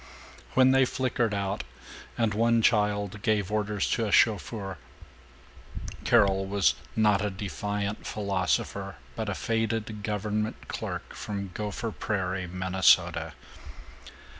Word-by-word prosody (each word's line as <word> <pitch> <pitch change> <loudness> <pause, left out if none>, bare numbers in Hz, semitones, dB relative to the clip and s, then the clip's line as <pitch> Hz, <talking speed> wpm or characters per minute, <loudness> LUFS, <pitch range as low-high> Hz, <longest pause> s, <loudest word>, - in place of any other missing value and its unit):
When 130 0 +6
they 135 0 +5
flickered 125 -3 0
out 100 0 -2 0.5
and 115 -3 +1
one 115 +1 +3
child 105 -2 +2
gave 105 -2 +1
orders 105 -2 0
to 115 -2 +1
a - - -3
chauffeur, 100 -3 +2 1.3
Carol 100 -4 +4
was 95 -9 +3 0.2
not 105 -2 +3
a 105 - 0
defiant 100 +1 -3
philosopher 95 -6 -1 0.2
but - - -3
a - - -2
faded 110 -1 -1
government 105 +1 -2
clerk - - -5
from 100 -3 -5
Gopher 105 +2 -3
Prairie, 95 -4 -2
Minnesota. 95 +1 +2
105 Hz, 115 wpm, -28 LUFS, 100-110 Hz, 1.3 s, When